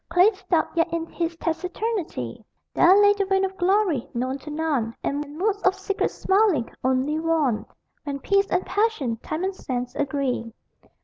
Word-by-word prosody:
Clay 360 +5 +5
stopped, 380 -6 -1
yet 335 0 +2
in 335 -1 -2
his 335 0 -3
taciturnity 335 - -3 0.3
There 370 +3 +6
lay 410 0 +6
the 405 -1 0
vein 385 0 +2
of 380 0 -5
glory, 370 - +1
known 255 +3 -2
to 300 - -10
none; 295 -7 -1
And 290 +1 -3
moods 405 +3 0
of 375 0 +3
secret 390 +1 -1
smiling, 380 - +1
only 260 +4 +1
won 315 -8 0 0.4
When 285 -2 -3
peace 395 +7 +2
and 360 - 0
passion, 370 - 0
time 310 +9 -4
and 380 0 -1
sense, 250 -6 -4
agree. 270 -5 -1
330 Hz, 165 wpm, -24 LUFS, 275-385 Hz, 0.4 s, There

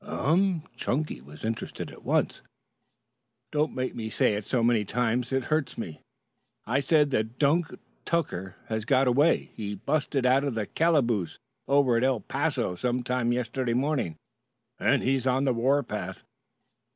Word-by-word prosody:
"Em" 185 -3 +1
Chunky 130 - -2
was 75 +7 -10
interested 115 0 -4
at - - -14
once. - - 0 1.1
"Don't 150 +1 0
make 130 0 -2
me 110 -2 -4
say 105 - +2
it 105 0 -3
so 125 -3 0
many 115 -2 +3
times. 125 +3 0
It 135 -1 +1
hurts 155 -1 -1
me. 80 -9 -6 0.6
I 125 +5 +1
said 145 0 +3
that 110 0 -1
Dunk 160 +4 +3 0.4
Tucker 95 - -2
has 110 -1 -2
got 130 +3 +3
away. 145 +7 +3
He 105 -2 -4
'busted' 140 +4 -1
out 130 +2 +4
of 140 -5 -2
the 110 -2 -1
calaboose 120 - +1 0.3
over 135 -4 +4
at 115 - +1
El 130 -3 +2
Paso - - -1
some 125 +7 -1
time 125 -1 0
yesterday 120 0 -1
morning 130 - 0 0.6
and - - +2
he's 130 0 +1
on 130 +1 +2
the 130 - +3
warpath." 115 -6 -1
125 Hz, 155 wpm, -27 LUFS, 115-140 Hz, 1.1 s, out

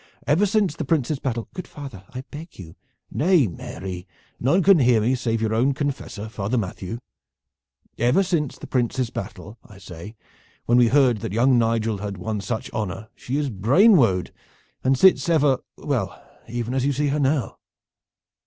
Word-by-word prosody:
Ever 175 +8 +3
since 200 -6 +1
the - - -3
Prince's 150 -3 0
battle 120 -4 -3
" - - -50
"Good 180 - -7
father, 135 -10 -10
I 130 - -6
beg 160 +3 -10
you 80 -4 -11 0.2
" - - -49
"Nay, 170 -3 +5
Mary, 90 0 -7 0.3
none 160 +10 +2
can 195 -2 +6
hear 125 -4 +4
me, 115 +4 +1
save 115 -3 -1
your 110 0 0
own 130 +5 +2
confessor, 135 -7 -4
Father 110 +2 -2
Matthew. 100 0 -4 1.0
Ever 125 +11 +3
since 165 -7 -1
the - - -9
Prince's 125 -1 -1
battle, 100 +2 -7
I 105 - -15
say, 95 +3 -10 0.5
when 120 +1 +4
we 120 - +5
heard 125 -3 +3
that 95 - -5
young 125 +2 +4
Nigel 115 -2 0
had 100 -1 -5
won 105 +3 -3
such 110 +3 -4
honor 110 +1 -4
she 130 +3 -4
is 145 -3 -1
brain 140 - +5
wode, 95 - +2 0.5
and 130 +1 +3
sits 190 +2 +5
ever 145 -5 +3 0.2
well, 125 -10 -2 0.3
even 120 +1 -3
as 130 -1 0
you 140 +1 +1
see 145 +2 0
her 150 +2 0
now." 135 -5 0
120 Hz, 180 wpm, -23 LUFS, 110-145 Hz, 1.0 s, can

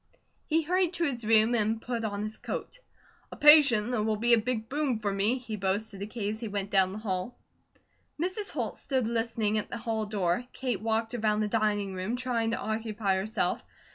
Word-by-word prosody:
He 320 +1 +2
hurried 360 +2 +1
to 345 - +1
his 255 -7 -1
room, 225 +1 +5
and 220 -1 +1
put 235 0 -4
on 205 -1 -2
his 215 +1 -5
coat. - - -5 0.5
"A - - -7
patient 280 -7 +6
that 245 -3 0
will 215 0 +1
be 235 +3 +3
a 235 - +6
big 225 -1 -2
boom 280 -3 0
for 210 -2 -2
me," 205 +6 +2
he 230 -4 -6
boasted 200 +1 -2
to 200 - -4
Kate 215 -2 -3
as 215 - -6
he 230 - -4
went 200 -1 -3
down 190 -1 +3
the 200 - -6
hall. 195 +1 -3 0.8
Mrs. 375 +5 -2
Holt - - -3
stood 260 -4 -1
listening 225 -2 0
at - - -6
the - - -4
hall 225 -2 -2
door. 195 0 0
Kate 245 -7 -2
walked 225 +1 0
around 215 -2 +1
the 215 - +1
dining 205 -2 0
room, 185 +5 -2
trying 245 -3 0
to 230 - -1
occupy 220 -3 -1
herself. 210 +4 -1
220 Hz, 205 wpm, -29 LUFS, 210-245 Hz, 0.8 s, patient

